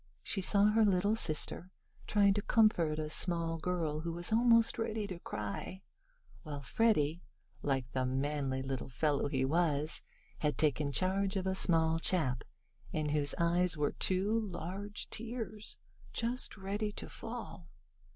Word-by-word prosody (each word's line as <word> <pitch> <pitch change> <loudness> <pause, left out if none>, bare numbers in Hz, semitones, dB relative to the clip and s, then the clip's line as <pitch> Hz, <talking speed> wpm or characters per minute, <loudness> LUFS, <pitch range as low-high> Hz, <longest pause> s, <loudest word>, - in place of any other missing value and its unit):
She 195 - -1
saw 205 +2 +4
her 220 +1 +4
little 200 +1 +3
sister 175 -2 -2 0.4
trying 200 -1 +4
to 205 - -1
comfort 200 -10 +3
a 155 -1 -2
small 165 0 0
girl 160 -3 -1
who 165 +1 -3
was 175 +4 -2
almost 230 0 +4
ready 220 -1 -1
to 185 -4 -6
cry, 105 - -5 0.6
while 145 -3 -6
Freddie, 165 - +2 0.4
like 135 -3 0
the 130 +1 0
manly 135 0 -1
little 135 -1 -4
fellow 140 +3 +1
he 130 -2 0
was, 155 0 +1 0.4
had 150 -1 0
taken 145 -1 +2
charge 190 +4 0
of 190 -1 -1
a 190 - +1
small 165 -3 +3
chap 140 -9 +1 0.5
in 155 -1 -1
whose 145 -1 0
eyes 170 0 +2
were 150 -1 +1
two 195 +4 +1
large 200 0 -5
tears, 225 -2 -5 0.4
just 235 0 -3
ready 205 +2 -2
to - - -6
fall. 225 -7 -8
175 Hz, 145 wpm, -33 LUFS, 150-205 Hz, 0.6 s, saw